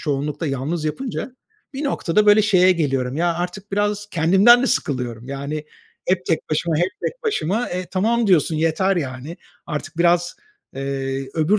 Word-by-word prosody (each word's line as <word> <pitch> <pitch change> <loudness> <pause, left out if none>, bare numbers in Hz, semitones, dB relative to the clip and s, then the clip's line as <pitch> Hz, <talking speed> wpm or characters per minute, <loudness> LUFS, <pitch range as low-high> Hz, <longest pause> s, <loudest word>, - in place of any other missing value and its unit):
çoğunlukla 150 +1 -2
yalnız 145 +4 -2
yapınca 250 - -4 0.4
bir 285 +3 -3
noktada 210 -6 +1
böyle 210 +1 +7
şeye 185 -3 +5
geliyorum, 135 -5 -1
ya, 170 0 +1
artık 180 +4 -5
biraz 205 0 0
kendimden 195 +9 +5
de - - +2
sıkılıyorum 125 - -2
yani 140 +2 -4 0.4
hep 185 0 +1
tek 165 - -1
başıma, 155 +1 0
hep 175 +3 +1
tek - - -4
başıma, 230 - 0
e, 180 0 -4
tamam 225 +4 +1
diyorsun, 165 -4 +3
yeter, 170 +4 +1
yani. 140 +2 -4 0.3
Artık 150 +1 -5
biraz, 175 0 +2 0.4
eee, 135 0 -3
öbür 165 +7 +2
170 Hz, 155 wpm, -21 LUFS, 145-200 Hz, 0.4 s, böyle